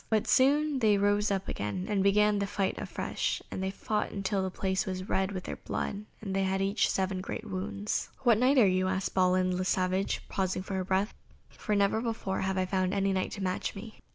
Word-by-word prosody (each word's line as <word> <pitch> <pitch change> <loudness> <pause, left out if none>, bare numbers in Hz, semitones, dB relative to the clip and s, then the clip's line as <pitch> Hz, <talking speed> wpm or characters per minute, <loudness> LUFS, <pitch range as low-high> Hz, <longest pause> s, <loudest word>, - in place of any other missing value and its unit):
But 220 -2 +1
soon 285 +2 +3
they 215 -4 +4
rose 205 +1 +2
up 195 -1 -1
again 105 - -3
and 205 -3 +1
began 205 +1 +4
the 200 - -1
fight 200 -1 -1
afresh, - - -2
and - - -4
they 190 - -1
fought 200 0 -2
till 195 -1 +1
the 190 - -1
place 190 +1 -1
was 185 0 -4
red 190 +1 0
with 185 -2 -4
their - - -5
blood, 205 +1 -4 0.2
and 195 -3 -4
they 195 - +2
had 190 0 0
each 195 +2 +1
seven 190 -1 -1
great - - -5
wounds. 200 +2 -3
"What 235 -4 +5
Knight 260 +3 +4
are 240 - +7
you?" 185 -1 +2
asked 190 +1 -1
Balin 185 0 +3
le 185 - -1
Savage, 185 +1 0
pausing 185 -1 -1
for 190 -1 -2
breath, 190 +3 0 0.4
"for 210 - -2
never 200 +2 +2
before 225 -5 -2
have 190 0 -1
I 185 - +2
found 185 0 0
any 195 0 +1
Knight 185 -1 0
to 200 - -5
match 185 -1 -2
me." 215 +2 -9
195 Hz, 215 wpm, -30 LUFS, 185-205 Hz, 0.4 s, are